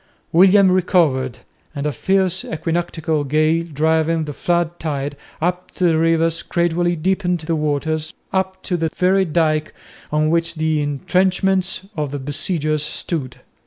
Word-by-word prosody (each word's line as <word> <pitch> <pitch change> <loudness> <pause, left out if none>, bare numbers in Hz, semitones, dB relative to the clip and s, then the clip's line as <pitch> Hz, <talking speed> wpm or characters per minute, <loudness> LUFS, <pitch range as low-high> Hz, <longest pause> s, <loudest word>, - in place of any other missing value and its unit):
William 190 +2 +6
recovered, 160 - +2 0.4
and 140 0 -3
a 150 - +1
fierce 190 +6 +1
equinoctial 160 -2 -2
gale 155 +3 +2
driving 160 +2 +1
the 145 - -5
flood 175 +2 -1
tide 145 -2 -3 0.2
up 180 +2 -1
the 175 -3 +2
rivers 165 0 +2
gradually 175 0 0
deepened 180 +1 0
the 165 +1 -1
waters 155 +1 -1 0.2
up 190 0 -1
to 180 - -1
the 165 -1 0
very 190 +1 +3
dyke 155 -2 0 0.4
on 155 +1 +2
which 170 0 0
the 155 -1 0
entrenchments 185 +6 0
of 150 -3 -2
the 145 - -4
besiegers 150 +2 -1
stood. 150 -3 -4
165 Hz, 135 wpm, -20 LUFS, 155-180 Hz, 0.4 s, William